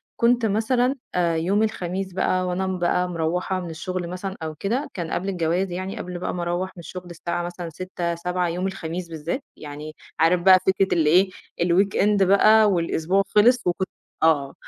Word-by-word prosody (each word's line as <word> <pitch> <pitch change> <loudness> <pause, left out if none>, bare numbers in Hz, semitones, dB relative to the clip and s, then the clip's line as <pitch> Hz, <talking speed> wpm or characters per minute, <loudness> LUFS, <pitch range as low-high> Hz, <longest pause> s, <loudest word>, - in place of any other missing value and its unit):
كُنت 235 0 +3
مثلًا 240 +5 +1 0.2
آآ، 170 -2 +2
يوم 190 +6 +1
الخميس 190 -3 -3
بقى 185 0 0
وأنا 185 +1 -1
بقى 180 -1 0
مرَوّحة 180 +3 -1
من 175 - -6
الشغل 180 +2 -4
مثلًا 190 +1 -5
أو 155 -1 -4
كده، 235 - -2
كان 170 -3 -5
قبل 190 +3 -2
الجواز 180 +1 0
يعني 185 +4 -4
قبل 180 -4 -5
بقى - - -3
ما 175 -1 -3
أروّح 175 +2 -2
من - - -11
الشغل 180 +2 -8
الساعة 170 +1 -3
مثلًا 175 -1 -6
18:00 170 0 -4
19:00 180 +1 -1
يوم 180 +3 -2
الخميس 175 -2 -5
بالذات، 165 - -4
يعني 150 +1 -8 0.2
عارف 170 +2 +4
بقى 185 0 +7
فكرة 190 0 +3
اللي 155 -2 +3
إيه، 185 +4 +5 0.3
الweekend 195 +3 +3
بقى 215 +3 +6
والأسبوع 175 +2 +1
خلص 235 +1 +4
وكُنت 180 +2 0 0.3
آه، 145 -4 +3
180 Hz, 175 wpm, -23 LUFS, 170-195 Hz, 0.3 s, بقى